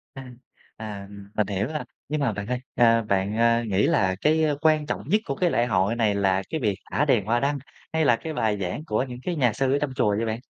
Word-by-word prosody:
À, 135 Hz, -, -7 dB, 0.5 s
à, 105 Hz, -3 st, -7 dB
ừm, 100 Hz, -1 st, -12 dB
mình 105 Hz, -2 st, +1 dB
hiểu 100 Hz, +1 st, -1 dB
rồi. 155 Hz, +1 st, -3 dB, 0.3 s
Nhưng 150 Hz, -1 st, -1 dB
mà 125 Hz, -5 st, +2 dB
bạn 100 Hz, +1 st, -5 dB
ơi, 125 Hz, 0 st, -1 dB, 0.2 s
a, 115 Hz, -1 st, +5 dB
bạn, 100 Hz, 0 st, -1 dB
a, 115 Hz, 0 st, +3 dB
nghĩ 100 Hz, -3 st, +1 dB
là 95 Hz, -1 st, +2 dB
cái 155 Hz, +1 st, +3 dB, 0.2 s
quan 155 Hz, -2 st, +3 dB
trọng -, -, -3 dB
nhất 210 Hz, +3 st, +3 dB
của 135 Hz, -, -3 dB
cái 180 Hz, +2 st, +1 dB
lễ 120 Hz, -, +2 dB
hội 100 Hz, 0 st, +1 dB
này 110 Hz, -3 st, +1 dB
là 95 Hz, -1 st, +1 dB
cái 160 Hz, -, -2 dB
việc 105 Hz, -4 st, +1 dB, 0.2 s
thả 145 Hz, -, +2 dB
đèn 120 Hz, -9 st, +2 dB
hoa 115 Hz, +3 st, +2 dB
đăng 140 Hz, +2 st, 0 dB, 0.4 s
hay 160 Hz, -1 st, +2 dB
là 120 Hz, -, +5 dB
cái 160 Hz, +6 st, -6 dB
bài 110 Hz, -6 st, 0 dB
giảng 90 Hz, +12 st, -3 dB
của 110 Hz, -2 st, 0 dB
những 125 Hz, -2 st, -7 dB
cái 180 Hz, -2 st, -2 dB
nhà 125 Hz, -7 st, +2 dB
sư 135 Hz, +3 st, 0 dB
ở -, -, +3 dB
trong 140 Hz, -3 st, -2 dB
chùa 105 Hz, -6 st, +2 dB
vậy 115 Hz, -, 0 dB
bạn? 110 Hz, 0 st, -2 dB
115 Hz, 260 wpm, -25 LUFS, 105-140 Hz, 0.5 s, a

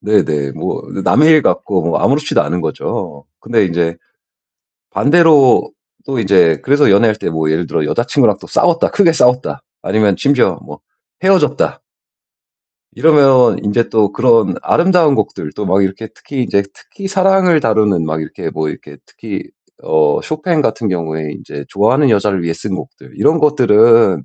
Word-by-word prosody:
네네. 75 Hz, -10 st, -1 dB
뭐 -, -, -5 dB, 0.2 s
남의 155 Hz, +2 st, +4 dB
일 155 Hz, -3 st, +5 dB
같고 95 Hz, -4 st, -1 dB
뭐 85 Hz, 0 st, -1 dB
아무렇지도 145 Hz, +4 st, 0 dB
않은 85 Hz, +4 st, -3 dB
거죠. 70 Hz, -3 st, -5 dB, 0.2 s
근데 115 Hz, -3 st, 0 dB
인제 85 Hz, -1 st, -2 dB, 0.9 s
반대로 150 Hz, -3 st, +3 dB, 0.3 s
또 135 Hz, -3 st, -4 dB
이제 95 Hz, -6 st, +2 dB
그래서 145 Hz, -3 st, +3 dB
연애할 105 Hz, +2 st, +3 dB
때 -, -, -4 dB
뭐 80 Hz, -1 st, -2 dB
예를 80 Hz, +2 st, -1 dB
들어 -, -, -2 dB
'여자친구랑 -, -, 0 dB
또 -, -, -12 dB
싸웠다. 170 Hz, -1 st, +1 dB
크게 180 Hz, -5 st, +2 dB
싸웠다.' 125 Hz, -4 st, 0 dB, 0.2 s
아니면 105 Hz, -3 st, 0 dB
심지어 140 Hz, -2 st, +1 dB
뭐 -, -, -12 dB, 0.4 s
'헤어졌다.' 190 Hz, -6 st, +1 dB, 1.1 s
이러면 140 Hz, -5 st, +4 dB
인제 110 Hz, +3 st, 0 dB
또 105 Hz, -2 st, 0 dB
그런 115 Hz, -6 st, +2 dB
아름다운 170 Hz, -4 st, +2 dB
곡들 75 Hz, -, -4 dB
또 105 Hz, -, -5 dB
막 95 Hz, +1 st, +1 dB
이렇게 95 Hz, +4 st, -4 dB
특히 135 Hz, -3 st, -6 dB
이제 100 Hz, -4 st, 0 dB
특히 200 Hz, -2 st, -11 dB
사랑을 190 Hz, -3 st, +2 dB
다루는 105 Hz, -, +1 dB
막 80 Hz, 0 st, -3 dB
이렇게 80 Hz, -, -6 dB
뭐 80 Hz, -1 st, -4 dB
이렇게 75 Hz, -1 st, -10 dB
특히 -, -, -8 dB, 0.4 s
어 75 Hz, -2 st, +1 dB
쇼팽 155 Hz, +1 st, -2 dB
같은 115 Hz, -4 st, -2 dB
경우에 80 Hz, -4 st, -4 dB
인제 70 Hz, 0 st, -9 dB
좋아하는 125 Hz, +7 st, +1 dB
여자를 100 Hz, -3 st, 0 dB
위해 85 Hz, -1 st, -2 dB
쓴 95 Hz, +4 st, -6 dB
곡들 -, -, -10 dB
이런 165 Hz, +2 st, +2 dB
것들은 115 Hz, -, +3 dB
110 Hz, 330 characters per minute, -14 LUFS, 85-145 Hz, 1.1 s, 일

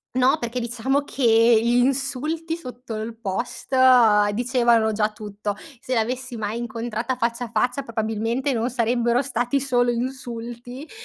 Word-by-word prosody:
No, 260 Hz, +4 st, +3 dB
perché 240 Hz, +1 st, -3 dB
diciamo 245 Hz, +4 st, -1 dB
che 280 Hz, -2 st, -5 dB, 0.4 s
gli 235 Hz, +1 st, +1 dB
insulti 280 Hz, +5 st, -1 dB
sotto 250 Hz, -5 st, -8 dB
il 220 Hz, +1 st, -5 dB
post 235 Hz, +5 st, -4 dB, 0.6 s
dicevano 235 Hz, -1 st, +2 dB
già 215 Hz, 0 st, 0 dB
tutto. 205 Hz, -1 st, -5 dB, 0.2 s
Se 255 Hz, -, -4 dB
l'avessi 250 Hz, +2 st, -2 dB
mai 215 Hz, +1 st, -3 dB
incontrata 235 Hz, +1 st, -3 dB
faccia 235 Hz, 0 st, -1 dB
a -, -, -10 dB
faccia, 250 Hz, +2 st, 0 dB
probabilmente 225 Hz, +3 st, -2 dB
non 235 Hz, 0 st, -1 dB
sarebbero 240 Hz, +1 st, +1 dB
stati 250 Hz, +1 st, -1 dB
solo 245 Hz, -2 st, +2 dB
insulti, 240 Hz, +2 st, -6 dB
240 Hz, 135 wpm, -23 LUFS, 230-260 Hz, 0.6 s, No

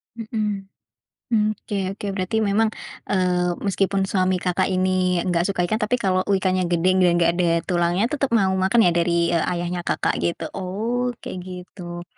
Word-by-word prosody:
Mhm. 215 Hz, -3 st, -3 dB, 0.7 s
M 215 Hz, -2 st, +4 dB
oke 205 Hz, -, -6 dB, 0.2 s
oke. 205 Hz, -, -6 dB
Berarti 185 Hz, +2 st, -2 dB
memang, 210 Hz, +2 st, +2 dB, 0.4 s
eee, 180 Hz, -2 st, +1 dB
meskipun 195 Hz, 0 st, +1 dB
suami 185 Hz, -1 st, +1 dB
Kakak 180 Hz, 0 st, 0 dB
ini, 185 Hz, -1 st, +1 dB
nggak 175 Hz, 0 st, +1 dB
suka 180 Hz, -3 st, 0 dB
ikan, 215 Hz, +5 st, -1 dB
tapi 215 Hz, +4 st, +1 dB
kalau 185 Hz, -5 st, +1 dB
ikannya 185 Hz, -2 st, +1 dB
gede 175 Hz, +1 st, +1 dB
dan 180 Hz, -1 st, +5 dB
nggak 170 Hz, -1 st, +3 dB
ada 180 Hz, -, +1 dB, 0.2 s
tulangnya, 175 Hz, +2 st, +1 dB
tetep 275 Hz, -2 st, 0 dB
mau 190 Hz, -3 st, +2 dB
makan, 190 Hz, +5 st, +3 dB
ya? 175 Hz, -, +5 dB
Dari, 170 Hz, 0 st, +1 dB
eee, 165 Hz, -2 st, +2 dB
ayahnya 175 Hz, +1 st, -3 dB
Kakak, 170 Hz, -, 0 dB
gitu? 170 Hz, -1 st, -2 dB
Oh, 225 Hz, +7 st, -2 dB, 0.2 s
kayak 185 Hz, -, -5 dB
gitu. 180 Hz, -1 st, -8 dB
185 Hz, 170 wpm, -22 LUFS, 175-200 Hz, 0.7 s, dan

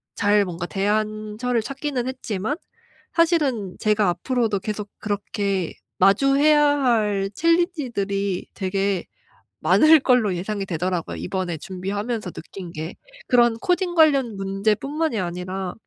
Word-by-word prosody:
잘 205 Hz, -1 st, +3 dB
뭔가 175 Hz, -1 st, -5 dB
대안처를 215 Hz, +3 st, -1 dB
찾기는 275 Hz, -2 st, -3 dB
했지만 250 Hz, -1 st, -3 dB, 0.6 s
사실은 290 Hz, -, +1 dB
제가 210 Hz, -2 st, +2 dB
앞으로도 220 Hz, +3 st, 0 dB
계속 210 Hz, +1 st, -5 dB
그렇게 200 Hz, -3 st, -2 dB, 0.3 s
마주해야 275 Hz, +8 st, +5 dB, 0.2 s
할 210 Hz, -5 st, +1 dB
챌린지들이 245 Hz, -, 0 dB
되게 195 Hz, -1 st, -1 dB, 0.5 s
많을 310 Hz, 0 st, +6 dB
걸로 245 Hz, -8 st, +2 dB
예상이 195 Hz, +2 st, -3 dB
되더라고요 180 Hz, -1 st, -2 dB
이번에 180 Hz, -3 st, -3 dB
준비하면서 200 Hz, +4 st, -4 dB
느낀 180 Hz, +1 st, -9 dB
게. 160 Hz, +2 st, -6 dB, 0.3 s
그런 240 Hz, -2 st, +4 dB
코딩 355 Hz, +2 st, 0 dB
관련 275 Hz, -9 st, +4 dB
문제뿐만이 215 Hz, +9 st, -1 dB
아니라 180 Hz, +1 st, -4 dB
210 Hz, 285 characters per minute, -23 LUFS, 195-255 Hz, 0.6 s, 많을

